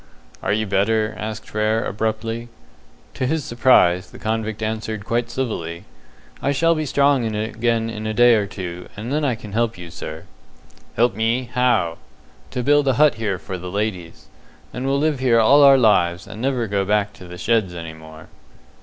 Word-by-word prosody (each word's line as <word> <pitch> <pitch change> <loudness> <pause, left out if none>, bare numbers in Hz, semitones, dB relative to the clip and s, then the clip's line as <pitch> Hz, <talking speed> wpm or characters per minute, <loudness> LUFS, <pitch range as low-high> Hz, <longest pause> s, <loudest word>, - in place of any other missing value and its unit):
"Are - - -1
you 110 +1 +1
better?" 110 +2 +1
asked 105 0 -6
Frere, 110 +1 0
abruptly. 110 +2 -3 0.7
To 130 - -2
his 155 +1 -1
surprise, 110 -8 +3
the - - -13
convict 110 -1 -3
answered 110 -1 -3
quite 115 0 -1
civilly, 85 -10 -4 0.6
"I 140 - +1
shall 165 +4 +3
be 155 -2 -2
strong 140 -1 +3
again 115 +1 -1
in 110 -1 -5
a 110 - -2
day 120 +1 +6
or 105 -3 +1
two, 90 -3 -7
and 115 +6 -4
then 150 +1 0
I 130 -5 +1
can 110 -3 -11
help 115 -1 0
you, 85 -1 -9
sir." 80 -1 -7 0.7
"Help 120 -2 +3
me? 115 +4 -1
How?" 120 -10 +1 0.5
"To 125 - -3
build 145 +1 +3
a 135 - +4
hut 150 +4 +4
here 105 -4 -1
for 95 0 -7
the 90 +1 -7
ladies. 90 -6 -4 0.5
And 125 +2 -3
we'll 135 +1 +2
live 150 -1 0
here 125 -3 +3
all 140 +6 +6
our 140 -1 +8
lives, 95 -7 +3
and 110 - -9
never 130 -2 0
go 100 -2 0
back 105 +1 0
to 95 -2 -13
the 90 0 -9
sheds 105 -4 0
any 85 -1 -6
more." 80 0 -13
110 Hz, 185 wpm, -21 LUFS, 100-125 Hz, 0.7 s, our